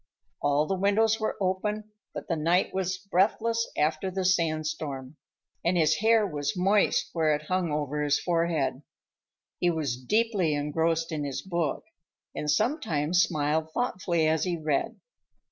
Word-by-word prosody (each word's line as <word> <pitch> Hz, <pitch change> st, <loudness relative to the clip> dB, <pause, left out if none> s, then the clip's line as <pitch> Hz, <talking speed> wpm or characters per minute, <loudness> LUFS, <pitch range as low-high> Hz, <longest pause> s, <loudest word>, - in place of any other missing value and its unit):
All 145 Hz, +1 st, +2 dB
the 195 Hz, -, -1 dB
windows 220 Hz, +3 st, +3 dB
were 215 Hz, -, -2 dB
open, 210 Hz, +3 st, -2 dB, 0.2 s
but -, -, -7 dB
the 165 Hz, -, 0 dB
night 170 Hz, +4 st, +1 dB
was 190 Hz, 0 st, -1 dB
breathless 215 Hz, +5 st, +1 dB
after 155 Hz, +5 st, +1 dB
the 190 Hz, 0 st, -3 dB
sandstorm, 155 Hz, -5 st, -1 dB, 0.5 s
and 175 Hz, +1 st, +2 dB
his 155 Hz, -2 st, +3 dB
hair 220 Hz, 0 st, +4 dB
was 145 Hz, -3 st, -3 dB
moist 195 Hz, +3 st, +2 dB
where 155 Hz, -2 st, +2 dB
it 150 Hz, -, -6 dB
hung 180 Hz, 0 st, -1 dB
over 150 Hz, 0 st, -2 dB
his 145 Hz, 0 st, +2 dB
forehead. 165 Hz, -6 st, 0 dB, 0.8 s
He 175 Hz, -, +2 dB
was 140 Hz, -7 st, -2 dB
deeply 205 Hz, -, +1 dB
engrossed 160 Hz, +3 st, 0 dB
in 155 Hz, -2 st, -2 dB
his 140 Hz, -2 st, -4 dB
book 170 Hz, -5 st, -2 dB, 0.5 s
and 150 Hz, -, -3 dB
sometimes 175 Hz, -, +1 dB
smiled 155 Hz, -1 st, 0 dB
thoughtfully 180 Hz, -9 st, 0 dB
as 160 Hz, 0 st, +1 dB
he 175 Hz, -2 st, -1 dB
read. 155 Hz, -3 st, -1 dB
165 Hz, 145 wpm, -27 LUFS, 150-190 Hz, 0.8 s, hair